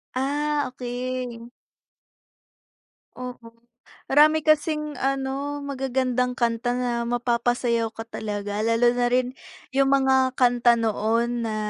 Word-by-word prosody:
Ah, 290 Hz, +2 st, 0 dB
okey. 245 Hz, -1 st, -5 dB, 1.7 s
Oo, 250 Hz, -1 st, -5 dB, 0.8 s
marami 305 Hz, +2 st, +5 dB
kasing 300 Hz, -1 st, +1 dB
ano 275 Hz, +2 st, -2 dB
magagandang 255 Hz, -2 st, -1 dB
kanta 240 Hz, 0 st, 0 dB
na 250 Hz, 0 st, -1 dB, 0.2 s
mapapasayaw 240 Hz, -1 st, 0 dB
ka 225 Hz, -, -5 dB
talaga 205 Hz, -2 st, -4 dB
lalo 230 Hz, +2 st, +3 dB
na 245 Hz, 0 st, +1 dB
rin 250 Hz, +1 st, +1 dB, 0.4 s
yung 275 Hz, +1 st, +2 dB
mga 265 Hz, -1 st, +2 dB
kanta 245 Hz, -1 st, +4 dB
noon 230 Hz, +1 st, 0 dB
na 215 Hz, -, -3 dB
250 Hz, 105 wpm, -24 LUFS, 235-270 Hz, 1.7 s, marami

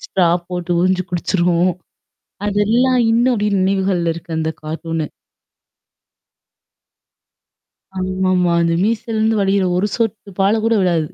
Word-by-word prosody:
Straw 180 Hz, -3 st, +2 dB, 0.2 s
போட்டு 180 Hz, -1 st, -5 dB
உரிஞ்சு 185 Hz, +1 st, +2 dB
குடிச்சுரும். 175 Hz, 0 st, +1 dB, 0.8 s
அதெல்லாம் 230 Hz, +5 st, +2 dB
இன்னும்பும் 225 Hz, -4 st, +2 dB
நினைவுகள்ல 190 Hz, -3 st, +1 dB
இருக்கு 170 Hz, 0 st, -11 dB
அந்த 160 Hz, 0 st, -1 dB
கார்ட்டூனு. 160 Hz, 0 st, -4 dB, 2.9 s
ஆமா 185 Hz, 0 st, -1 dB
ஆமா. 180 Hz, -1 st, +2 dB
அந்த 170 Hz, 0 st, +1 dB
மீசல்லருந்து 220 Hz, 0 st, 0 dB
வடிகிற 195 Hz, 0 st, +2 dB
ஒரு 195 Hz, +3 st, +1 dB
சொட்டு 220 Hz, -3 st, -2 dB
பால் 210 Hz, +3 st, +2 dB
கூட 230 Hz, -, +2 dB
விடாது. 170 Hz, -4 st, +1 dB
190 Hz, 110 wpm, -18 LUFS, 175-215 Hz, 2.9 s, Straw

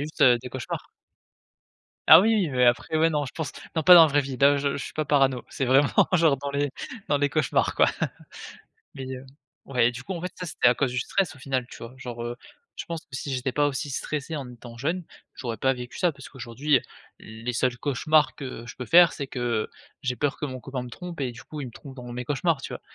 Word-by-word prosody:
a -, -, -2 dB
juste 155 Hz, -, -3 dB, 0.2 s
des 125 Hz, -, -6 dB
cauchemars. 130 Hz, -2 st, -6 dB, 1.2 s
Ah, -, -, +11 dB
oui, 225 Hz, +4 st, +3 dB
oui, 190 Hz, -8 st, +1 dB
mais 125 Hz, -2 st, +2 dB
après 120 Hz, +6 st, +2 dB
ouais, 160 Hz, +1 st, +4 dB
non, 150 Hz, -2 st, -1 dB
je 130 Hz, -, -8 dB
pense 160 Hz, -6 st, -4 dB, 0.2 s
non 160 Hz, -, 0 dB
pas 180 Hz, -, +9 dB
dans 170 Hz, -, +11 dB
la 160 Hz, -, +7 dB
vraie 145 Hz, 0 st, +2 dB
vie, 135 Hz, -1 st, -5 dB
là 140 Hz, +2 st, +5 dB
je 140 Hz, 0 st, -1 dB
je 140 Hz, -, -4 dB
suis -, -, -8 dB
pas 155 Hz, -1 st, -2 dB
parano, 135 Hz, -3 st, +2 dB
c'est 135 Hz, -, -2 dB
vraiment 135 Hz, +3 st, +5 dB, 0.3 s
genre 160 Hz, -5 st, +4 dB
dans 140 Hz, +1 st, -5 dB
les 140 Hz, -1 st, -1 dB, 0.4 s
dans 145 Hz, -, +2 dB
les 145 Hz, 0 st, +1 dB
cauchemars 150 Hz, -2 st, +1 dB
quoi. -, -, +5 dB, 1.1 s
Mais, 135 Hz, -1 st, -7 dB
heu, 130 Hz, -, -10 dB, 0.4 s
ouais, 125 Hz, -3 st, +2 dB
du 120 Hz, +1 st, -9 dB
coup 190 Hz, -, -5 dB
en 170 Hz, -, -5 dB
fait 180 Hz, -, -4 dB
ça, 180 Hz, -, -6 dB
c'était 140 Hz, -6 st, +1 dB
à 125 Hz, -, +5 dB
cause 135 Hz, -1 st, 0 dB
du 125 Hz, -, -1 dB
stress 190 Hz, +4 st, -1 dB
au 140 Hz, -, -16 dB
final, 130 Hz, -2 st, -2 dB
tu -, -, -12 dB
vois? 120 Hz, +3 st, -10 dB
Genre, 120 Hz, -2 st, -7 dB
heu, 120 Hz, 0 st, -4 dB, 0.4 s
je -, -, -6 dB
pense 165 Hz, -2 st, -5 dB
que 130 Hz, -, -11 dB
si 135 Hz, +1 st, -4 dB
j'étais 130 Hz, 0 st, -2 dB
pas 145 Hz, +3 st, +2 dB
aussi 145 Hz, +1 st, -3 dB
stressé 150 Hz, +3 st, -4 dB
en 140 Hz, -4 st, -5 dB
étant 120 Hz, -1 st, -12 dB
jeune, 165 Hz, +8 st, -2 dB, 0.3 s
j'aurais 120 Hz, -4 st, -5 dB
pas 130 Hz, +5 st, +2 dB
vécu 125 Hz, -1 st, -8 dB
ça 175 Hz, -2 st, +2 dB
parce 140 Hz, -2 st, -12 dB
qu'aujourd'hui, 130 Hz, +3 st, -1 dB
heu, -, -, -5 dB, 0.4 s
les 115 Hz, +3 st, -6 dB
seuls 125 Hz, +1 st, 0 dB
cauchemars 150 Hz, +2 st, +2 dB
que 130 Hz, -4 st, -7 dB
je -, -, -9 dB
peux 125 Hz, -, -6 dB
faire, 170 Hz, +5 st, +7 dB
c'est 140 Hz, -3 st, -5 dB
que 120 Hz, -4 st, -2 dB, 0.4 s
j'ai 125 Hz, -2 st, -1 dB
peur 145 Hz, +1 st, -1 dB
que 150 Hz, -, -3 dB
mon 130 Hz, -2 st, -6 dB
copain 130 Hz, -1 st, -5 dB
me 125 Hz, -, -8 dB
trompe 170 Hz, +4 st, -7 dB
et 125 Hz, -2 st, -1 dB
du 120 Hz, -, -12 dB
coup, 150 Hz, -, -8 dB
il -, -, -4 dB
me -, -, -11 dB
trompe 135 Hz, +3 st, -12 dB
dans 125 Hz, -, -9 dB
mes 125 Hz, +1 st, -4 dB
cauchemars, 145 Hz, +2 st, 0 dB
tu -, -, -6 dB
vois? -, -, -7 dB
135 Hz, 255 wpm, -25 LUFS, 125-150 Hz, 1.2 s, Ah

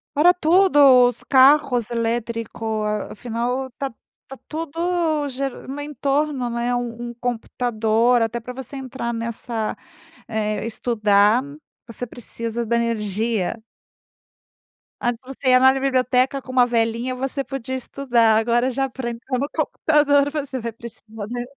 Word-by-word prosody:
Para 345 Hz, +5 st, +6 dB
tudo, 305 Hz, -8 st, +5 dB
os 245 Hz, -, -9 dB
carros 260 Hz, -3 st, +4 dB
elétrico 230 Hz, -1 st, -2 dB, 0.3 s
afinal 245 Hz, +4 st, -3 dB
está 265 Hz, +1 st, -6 dB, 0.4 s
está 270 Hz, -, -8 dB
tudo 325 Hz, -1 st, -1 dB
geran 270 Hz, 0 st, -5 dB
no 280 Hz, +2 st, -5 dB
entorno, 285 Hz, -2 st, -1 dB
né, 240 Hz, +1 st, -1 dB
um 240 Hz, 0 st, -4 dB
um -, -, -11 dB
computador, 235 Hz, -1 st, 0 dB
até 230 Hz, +1 st, -1 dB
para 250 Hz, +2 st, -7 dB
você 265 Hz, +2 st, -7 dB
entrar 260 Hz, -3 st, -4 dB
nessa, 230 Hz, -1 st, -3 dB, 0.5 s
eh, 215 Hz, -2 st, -2 dB
estudar, 215 Hz, -1 st, +2 dB, 0.5 s
você 230 Hz, +2 st, -4 dB
precisa 230 Hz, 0 st, -5 dB
da 235 Hz, -, 0 dB
energia. 220 Hz, -3 st, 0 dB, 1.4 s
Antes 240 Hz, -2 st, -1 dB
você 270 Hz, 0 st, -3 dB
ia 255 Hz, 0 st, +6 dB
na 260 Hz, 0 st, +7 dB
biblioteca 260 Hz, 0 st, +1 dB
com 255 Hz, -, -9 dB
uma 250 Hz, -1 st, +5 dB
velinha, 235 Hz, +1 st, 0 dB
você 270 Hz, +2 st, -3 dB
podia 260 Hz, -1 st, -5 dB
estudar, 240 Hz, -3 st, +2 dB
agora 240 Hz, +3 st, +2 dB
já 270 Hz, +1 st, -1 dB
pra 245 Hz, -1 st, -4 dB
entrar 245 Hz, +2 st, -4 dB
no 280 Hz, -, -1 dB
computador 290 Hz, -2 st, +2 dB
você 280 Hz, -4 st, -4 dB
vai 230 Hz, 0 st, -4 dB
precisar, 225 Hz, -2 st, -9 dB
né. 245 Hz, 0 st, -3 dB
245 Hz, 135 wpm, -22 LUFS, 230-270 Hz, 1.4 s, na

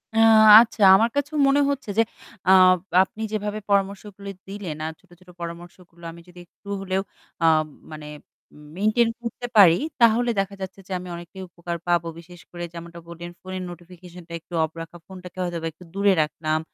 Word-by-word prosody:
আ -, -, -1 dB, 0.4 s
আচ্ছা, 230 Hz, -1 st, -3 dB
আমার 225 Hz, +4 st, +3 dB
কাছেও 285 Hz, +2 st, -2 dB
মনে 280 Hz, +1 st, +3 dB
হচ্ছে 275 Hz, -5 st, -4 dB
যে -, -, +6 dB, 0.5 s
আ -, -, +7 dB, 0.5 s
আপনি 210 Hz, +3 st, -11 dB
যেভাবে 210 Hz, 0 st, -3 dB
পরামর্শগুলো 200 Hz, 0 st, -2 dB, 0.2 s
দিলেন 195 Hz, -6 st, -6 dB
আর 160 Hz, -, -3 dB
ছোট, 190 Hz, -, -29 dB
ছোট 185 Hz, 0 st, -20 dB
পরামর্শগুলো 170 Hz, 0 st, -10 dB
আমি 170 Hz, +1 st, -13 dB
যদি 180 Hz, 0 st, -15 dB
একটু 190 Hz, -, -25 dB
হলেও 190 Hz, 0 st, -1 dB, 0.4 s
আ -, -, +4 dB, 0.5 s
মানে 155 Hz, -1 st, -9 dB, 0.7 s
মেইনটেইন 215 Hz, +4 st, +2 dB
করতে 240 Hz, +1 st, -6 dB
পারি, 180 Hz, -5 st, +8 dB, 0.3 s
তাহলে 235 Hz, +1 st, +4 dB
দেখা 195 Hz, 0 st, -2 dB
যাচ্ছে 190 Hz, +1 st, -7 dB
যে -, -, -13 dB
আমি 180 Hz, -, -9 dB
অনেকটাই 175 Hz, +2 st, -10 dB
উপকার 170 Hz, 0 st, -6 dB
পাবো। 170 Hz, -1 st, +1 dB
বিশেষ 175 Hz, +1 st, -14 dB
করে 175 Hz, 0 st, -7 dB
যেমনটা 170 Hz, 0 st, -10 dB
বললেন 170 Hz, 0 st, -9 dB
ফোনের 185 Hz, 0 st, -6 dB
নোটিফিকেশন 175 Hz, +1 st, -13 dB
টা 170 Hz, -, -10 dB
একটু 170 Hz, -, -18 dB
অফ 160 Hz, -, -1 dB
রাখা, 165 Hz, +1 st, -10 dB
ফোনটাকে 185 Hz, -1 st, -12 dB
হয়তো 175 Hz, -1 st, -3 dB
একটু 160 Hz, +3 st, -17 dB
দূরে 200 Hz, 0 st, +3 dB
রাখলাম 155 Hz, +1 st, -2 dB
185 Hz, 170 wpm, -23 LUFS, 170-205 Hz, 0.7 s, পারি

